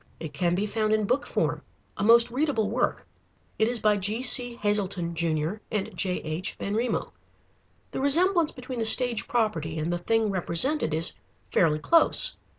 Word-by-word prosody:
It 160 -3 -8
can 175 -1 0
be 200 +3 -1
found 215 0 -1
in 215 -1 +1
book 255 +7 -1
form, - - -2 0.3
a - - -4
most 235 +2 +5
readable 250 -6 -1
work. 245 +2 -2 0.5
It 220 - +3
is 240 +1 0
by 210 -2 +1
G.C. 240 +4 +4
Hazelton, 200 -6 -2
Jr., 165 +2 -2
and 210 -3 -4
J.H. 180 -2 -3
Benrimo. 225 +5 -3 0.8
The - - -4
resemblance 335 +4 +3
between 255 -1 -8
the 225 - -1
stage 235 -2 +2
property 170 -10 -2
and 160 +3 -2
the 175 - -3
thing 220 +3 0
represented 185 - +1
is 160 +1 0 0.4
fairly 155 -4 +2
close. 330 - +2
215 Hz, 155 wpm, -25 LUFS, 175-245 Hz, 0.8 s, most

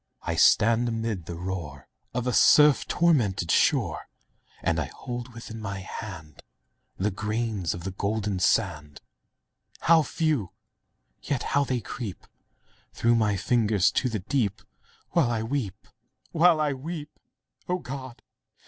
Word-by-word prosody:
I - - -2
stand 115 +3 +4
amid 110 -7 -3
the 85 - -5
roar 90 -4 -6 0.2
Of 125 0 -2
a 125 - 0
surf 150 +3 +6
tormented 110 - +2
shore, - - +2 0.6
And - - +1
I - - -1
hold 120 0 -7
within 115 -1 -8
my 100 -2 -4
hand 95 -7 -8 0.7
Grains 105 -3 -2
of 85 - -8
the 95 - -4
golden 100 0 -2
sand— 75 -4 0 0.8
How 165 0 +5
few! 150 - -1 0.7
yet 140 -4 -2
how 145 0 +3
they 125 -2 -1
creep 105 -1 -7 0.7
Through 115 0 +2
my 110 -3 +2
fingers 110 -2 +2
to 130 - 0
the 110 - -2
deep, 105 -2 -1 0.5
While 160 -8 +3
I 115 -2 -1
weep—while 145 - -1
I 150 -2 +1
weep! 150 +2 -7 0.5
O 180 - +1
God! 130 -6 -8
115 Hz, 130 wpm, -26 LUFS, 100-135 Hz, 0.8 s, surf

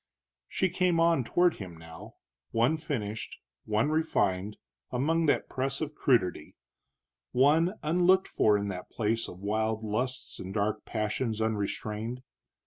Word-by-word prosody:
She 190 - 0
came 180 -1 +2
on 165 -5 +4
toward 175 +8 +2
him 90 -4 -8
now, 80 0 -12 0.3
one 120 +7 +2
finished, 110 -9 -4 0.3
one 110 +7 +1
refined, 105 - 0 0.3
among 160 +6 +1
that 145 - +2
press 135 0 -2
of 155 -1 -3
crudity, 90 - +1 0.8
one 155 +9 +4
unlooked 180 +4 +4
for 105 -1 +3
in 100 0 -2
that 90 -2 -6
place 115 0 -1
of 90 - -10
wild 110 +2 -1
lusts 125 +5 -3
and 95 +2 -7
dark 105 +1 -1
passions 110 +1 -2
unrestrained. 110 +2 -2
115 Hz, 135 wpm, -29 LUFS, 105-155 Hz, 0.8 s, on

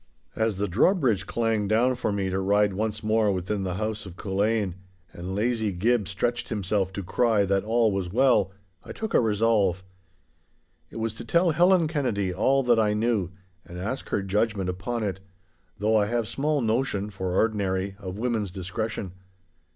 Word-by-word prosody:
As 110 -3 0
the 105 +1 -1
drawbridge 115 - +2
clanged 115 -3 0
down 120 +4 +3
for 125 -3 -2
me 100 -2 -1
to 95 - 0
ride 100 +1 +2
once 110 +2 -2
more 110 -1 +2
within 95 +2 -2
the 90 -2 -2
house 110 +1 -3
of 90 - -10
Culzean, 100 0 0 0.4
and 90 +2 -5
lazy 110 0 0
Gib 105 +3 +1
stretched 120 +6 -2
himself 100 -3 -1
to 100 - -4
cry 105 +2 +2
that 95 0 +1
all 115 0 +2
was 95 -2 -2
well, 120 -5 +3 0.3
I - - -8
took 220 -1 -5
a - - +6
resolve. 105 -5 +2 1.1
It - - -15
was 115 -1 -2
to - - -6
tell 170 +7 +2
Helen 175 +2 +4
Kennedy 120 - -1
all 135 +8 +2
that 120 -2 +3
I 105 -1 +2
knew, 110 -5 0 0.3
and 90 - -10
ask 105 +9 -4
her 100 - 0
judgment 100 -1 0
upon 110 +6 -3
it—though 95 +2 -4
I 105 -1 +3
have 115 0 -1
small 145 +3 0
notion 110 -3 0
(for 95 -2 -3
ordinary) 100 -3 0
of 95 -1 -6
women's 115 -3 -1
discretion. 95 +2 -4
105 Hz, 170 wpm, -26 LUFS, 95-115 Hz, 1.1 s, a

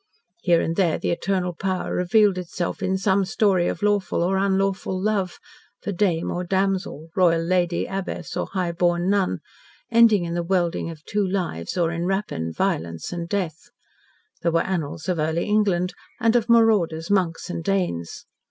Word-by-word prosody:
Here 170 -2 +4
and 165 - -1
there 175 -5 +2
the - - -1
eternal 180 0 -1
power 185 +2 -2
revealed 190 +1 +3
itself 180 +3 -4
in 190 0 0
some 195 0 +2
story 190 -2 +2
of 165 - -3
lawful 205 -4 +1
or 185 +2 +1
unlawful 195 -1 0
love 195 -2 -1 0.4
for 205 - -4
dame 175 -3 0
or 180 - -2
damsel, 190 -4 -1
royal 170 -3 +3
lady, 175 0 +1
abbess, 195 0 -5
or - - -2
high 185 -3 -2
born 175 +2 +1
nun 200 -2 +1 0.5
ending 225 -5 +5
in 170 - -3
the 175 - 0
welding 170 -1 0
of 160 -1 -10
two 205 -2 0
lives 180 - -3
or 170 -2 +2
in 170 0 -2
rapine, 190 - -2
violence, 85 - -2
and 170 -1 -5
death. 180 -6 -3 0.7
There 170 - +1
were 165 0 +2
annals 165 -4 -3
of 180 -3 0
early 160 +2 0
England, 195 -4 +1 0.3
and 230 -1 +3
of 235 -1 +2
marauders, 205 -8 +3
monks, 180 -5 +1
and 165 - -4
Danes. 175 - -2
180 Hz, 170 wpm, -23 LUFS, 170-195 Hz, 0.7 s, ending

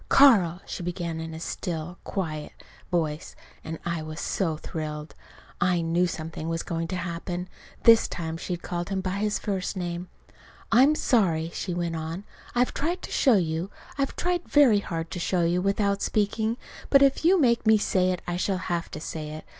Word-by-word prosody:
"Carl," 200 -11 +6
she - - -5
began 170 -2 -3
in 160 0 -5
a - - -6
still, 170 0 -4
quiet 155 -6 -4 0.4
voice, 160 -4 -1 0.3
and 160 +1 -5
I 170 -2 -1
was 155 +1 -6
so 165 -6 -1
thrilled. 150 -1 -5 0.5
I 175 -1 +3
knew 170 +2 +2
something 160 -1 -5
was 165 0 -1
going 165 0 -2
to 185 - -3
happen 175 0 -4 0.4
this 230 -1 +7
time 160 -2 -4
she'd 175 +1 -4
called 175 0 -3
him 195 -1 -1
by 190 +1 -2
his 210 0 +1
first 195 -1 -2
name. 175 0 -3 0.6
"I'm 270 +6 +6
sorry," 170 - +2
she 180 -3 -3
went 170 -1 -1
on. 160 +4 -4 0.3
"I've 245 +1 +2
tried 340 +5 -2
to - - -7
show 260 -5 +4
you. 165 0 0 0.3
I've 275 -1 -1
tried 355 0 -1
very 265 -8 +6
hard 165 -4 -4
to 180 - -4
show 175 0 +1
you 175 +2 +2
without 200 +1 +1
speaking. 220 +2 0 0.3
But 275 0 +7
if 275 +2 +3
you 365 +3 +5
make 235 -5 +3
me 220 0 +7
say 185 -3 +2
it 180 -1 -2
I 175 0 -2
shall 190 +1 0 0.2
have 170 -1 -2
to - - -6
say 155 -1 -5
it. 155 +1 -8
175 Hz, 185 wpm, -26 LUFS, 165-205 Hz, 0.6 s, this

